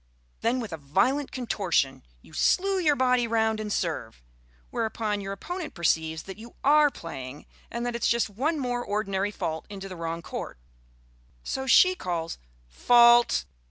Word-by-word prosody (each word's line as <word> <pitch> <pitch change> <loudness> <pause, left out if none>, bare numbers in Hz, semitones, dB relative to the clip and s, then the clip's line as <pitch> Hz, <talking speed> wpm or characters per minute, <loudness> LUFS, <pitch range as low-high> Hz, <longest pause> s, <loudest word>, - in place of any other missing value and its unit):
Then 240 +3 +1
with 220 -8 -5
a - - -4
violent 195 - 0
contortion 195 - 0 0.2
you - - -18
slue 385 - +2
your 305 -5 +3
body 250 -2 +2
round 220 -1 +1
and 210 -1 -4
serve, 145 - -3 0.5
whereupon 215 -2 -2
your 195 0 -5
opponent 350 - -6
perceives 160 -2 0
that 190 +2 -9
you 230 +1 -12
are 295 +1 +6
playing, 145 - -8 0.2
and 235 +1 -4
that 240 -1 -2
it 235 - -4
is - - +2
just 235 0 +2
one 270 +11 -1
more 245 -3 -2
ordinary 200 -2 -1
fault 160 -6 -4
into 195 -1 -7
the 185 - -8
wrong 165 0 -4
court. - - -6 0.9
So 265 0 -3
she 365 +8 +6
calls 170 - -4 0.3
"Fault!" 235 - +5
215 Hz, 160 wpm, -27 LUFS, 170-250 Hz, 0.9 s, are